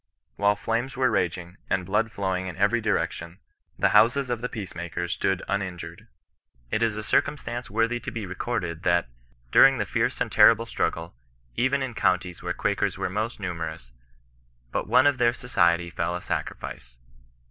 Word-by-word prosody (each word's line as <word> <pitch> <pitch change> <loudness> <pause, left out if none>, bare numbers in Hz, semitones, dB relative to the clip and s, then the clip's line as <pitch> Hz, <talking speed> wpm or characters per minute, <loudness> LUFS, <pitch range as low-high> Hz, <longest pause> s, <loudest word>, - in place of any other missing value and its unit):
While 100 +1 +3
flames 115 +5 -2
were 130 -1 +3
raging, 90 +1 -2
and 95 -2 0
blood 105 +4 0
flowing 95 -3 -2
in 90 - -7
every 105 +5 +2
direction, 90 -5 -2 0.4
the - - +3
houses 125 +3 +4
of 120 -1 -2
the 125 - -3
peace 105 -5 -6
makers 85 +1 -3
stood 95 -1 -1
uninjured. 90 -4 -4 0.6
It 110 - 0
is 115 -2 +1
a 105 - -4
circumstance 120 -1 -1
worthy 115 +1 +1
to - - -6
be 110 -3 -5
recorded, 90 -3 -3
that, 85 -8 +2 0.4
during 135 0 +7
the 105 - -1
fierce - - -1
and - - -1
terrible 115 0 +6
struggle, 85 -6 -2 0.4
even 135 +2 +1
in 130 -2 -4
counties 90 -4 0
where - - -3
Quakers - - -1
were - - -2
most 110 +4 -3
niunerous, 80 -8 -5 0.8
but - - -2
one 130 - +5
of 145 -2 +3
their 120 -1 +4
society 85 -8 +1
fell 85 +1 -2
a 90 - -4
sacrifice. - - -5
100 Hz, 170 wpm, -26 LUFS, 85-120 Hz, 0.8 s, during